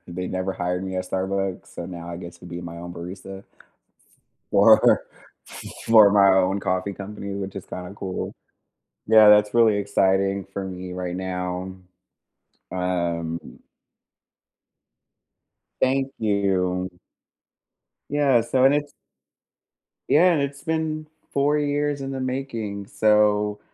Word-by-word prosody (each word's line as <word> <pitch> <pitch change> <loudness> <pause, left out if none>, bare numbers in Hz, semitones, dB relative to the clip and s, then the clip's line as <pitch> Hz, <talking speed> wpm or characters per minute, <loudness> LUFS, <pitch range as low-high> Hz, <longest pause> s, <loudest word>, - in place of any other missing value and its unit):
they 90 +1 -5
never 95 +1 -2
hired 90 +1 -2
me 95 - -5
at 90 - -2
Starbucks, 95 0 -2
so 85 - -6
now 85 -2 -8
I 85 - -5
get 85 -1 -9
to 85 - -17
be 85 0 -6
my 85 -1 -8
own 85 +1 -8
barista 95 +3 -8 1.1
for - - +6 0.5
f - - -10 0.2
for 110 -3 +7
my 100 -1 +6
own 95 +1 +2
coffee 95 +2 -2
company, 100 0 -7
which 100 0 -5
is 95 - -7
kinda 90 +1 -7
cool. 95 -2 -5 0.7
Yeah. 110 -1 +7
That's 105 +1 +5
really 115 -3 +5
exciting 95 -1 +1
for 95 0 -6
me 90 -1 -7
right 90 -1 -4
now. 90 0 -4 1.0
Um 85 -2 -2 2.4
Thank 135 +1 +1
you. 95 -4 0 1.2
Yeah. 140 -4 +3
So 130 +3 +1
and 135 +1 +6
it's 145 0 -1 1.1
Yeah, 175 +4 +5
and 155 - +1
it's 140 0 -4
been 160 -1 -2 0.3
4 145 +2 +2
years 145 0 -1
in 135 0 -4
the 135 - -4
making. 115 -7 -4
So, 105 -1 +2
100 Hz, 130 wpm, -23 LUFS, 90-115 Hz, 2.4 s, for